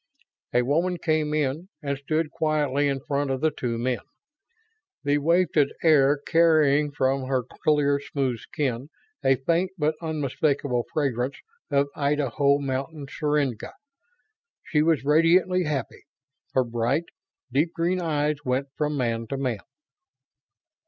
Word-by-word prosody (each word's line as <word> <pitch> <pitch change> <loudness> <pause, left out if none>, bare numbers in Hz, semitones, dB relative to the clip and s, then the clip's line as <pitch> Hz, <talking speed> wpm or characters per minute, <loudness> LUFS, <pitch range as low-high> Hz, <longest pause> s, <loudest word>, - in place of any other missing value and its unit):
A 125 - +3
woman 170 +7 +1
came 155 -2 0
in 150 +4 -1
and 140 -1 -1
stood 155 +3 -2
quietly 145 -2 +1
in 135 -1 -1
front 140 +1 -1
of 135 -1 -1
the 155 +2 +2
two 120 -4 -3
men, 125 0 -1 1.0
the 145 0 +2
wafted 165 -2 +2
air 145 -3 +5
carrying 150 -2 +3
from 135 -1 0
her 130 -2 0
clear, 145 +2 +1
smooth 135 -4 -2
skin 135 -4 -3 0.3
a 135 - +4
faint 170 +8 0
but 155 -1 +1
unmistakable 145 -5 -1
fragrance 135 -3 -1 0.3
of 140 0 +2
Idaho 140 -1 +2
mountain 140 +2 -4
syringa. 145 -7 -1 0.9
She 150 - +1
was 155 -3 +2
radiantly 170 +4 +4
happy; 150 -3 -4 0.5
her 130 - +3
bright, 120 +7 -1 0.5
deep 150 +6 +1
green 175 +2 0
eyes 150 -2 0
went 130 +1 -1
from 150 -1 -1
man 115 -3 -1
to 135 - -3
man. 125 -6 -2
145 Hz, 130 wpm, -25 LUFS, 135-155 Hz, 1.0 s, air